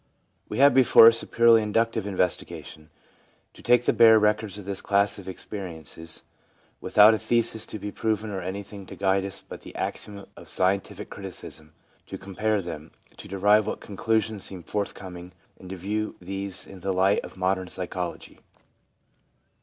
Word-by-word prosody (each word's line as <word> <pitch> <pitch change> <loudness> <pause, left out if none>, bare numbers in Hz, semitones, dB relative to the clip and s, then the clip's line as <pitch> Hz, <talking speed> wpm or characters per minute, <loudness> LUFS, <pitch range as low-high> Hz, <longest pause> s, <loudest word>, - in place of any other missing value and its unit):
We 105 - -4
have 140 +1 +6
before 125 -3 +7
us 115 0 +6
a - - -9
purely 115 -1 +5
inductive 110 0 0
investiga 90 -3 -1
tion, 75 0 -13 0.6
to - - -15
take 120 0 +3
the - - +3
bare 115 -1 +7
records 105 -1 +1
of 105 - -9
this 100 -1 -3
class 100 0 +1
of 95 -1 -9
experiences, 85 -4 -7 0.6
without 105 +1 +6
a 110 - 0
thesis 115 -2 0
to - - -6
be 105 0 -6
proven 110 -1 -2
or 95 -2 -4
anything 95 +1 -7
to - - -9
guide 95 0 +1
us 95 0 -7
but - - -9
the - - -12
axioms 100 -1 -5
of - - -13
scientific 95 +1 -1
criticism, 80 0 -8 0.3
to - - -6
compare 100 +2 -1
them, 80 -2 -7 0.3
to - - -10
derive 105 +2 +3
what - - -3
conclusions 110 0 -1
seem 95 -3 -4
forthcoming, 90 -3 -5 0.3
and 95 - -11
to 95 - -5
view 105 +4 -3
these 95 +1 -5
in 95 - -12
the 95 +2 -2
light 95 +2 +3
of - - -10
modern 95 0 0
psychology. 90 -1 -5
100 Hz, 170 wpm, -26 LUFS, 95-110 Hz, 0.6 s, before